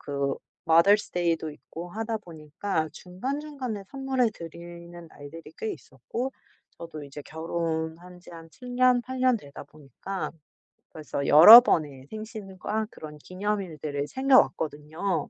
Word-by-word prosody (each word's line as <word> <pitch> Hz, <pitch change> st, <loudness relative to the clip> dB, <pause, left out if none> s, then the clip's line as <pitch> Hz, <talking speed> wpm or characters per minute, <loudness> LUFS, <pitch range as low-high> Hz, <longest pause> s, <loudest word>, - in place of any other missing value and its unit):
그 140 Hz, -1 st, -2 dB, 0.3 s
마더스데이도 170 Hz, -2 st, +3 dB
있고 170 Hz, +3 st, -10 dB
하다 225 Hz, +3 st, -3 dB
보니까 160 Hz, -1 st, -4 dB
중간중간에 255 Hz, -, -5 dB
선물해 265 Hz, -3 st, 0 dB
드리는 170 Hz, +1 st, -10 dB
날들이 155 Hz, +2 st, -12 dB
꽤 220 Hz, -, -3 dB
있었고 235 Hz, -, -6 dB, 0.5 s
저도 160 Hz, -3 st, -8 dB
이제 145 Hz, +1 st, -10 dB
결혼한 165 Hz, +2 st, -4 dB
지 -, -, -15 dB
한 165 Hz, -1 st, -12 dB
7 245 Hz, +7 st, -10 dB
년, 255 Hz, -1 st, +5 dB
8 260 Hz, +1 st, -6 dB
년 255 Hz, -1 st, +4 dB
되다 145 Hz, -9 st, -11 dB
보니까 155 Hz, +6 st, -7 dB, 0.6 s
벌써 150 Hz, -2 st, -5 dB
여러 210 Hz, +11 st, +12 dB
번의 145 Hz, -, -1 dB
생신과 215 Hz, -1 st, -5 dB
그런 150 Hz, -1 st, -10 dB
기념일들을 175 Hz, -6 st, -4 dB
챙겨 265 Hz, -, +5 dB
왔거든요. 160 Hz, +3 st, -3 dB
175 Hz, 275 characters per minute, -26 LUFS, 155-220 Hz, 0.6 s, 여러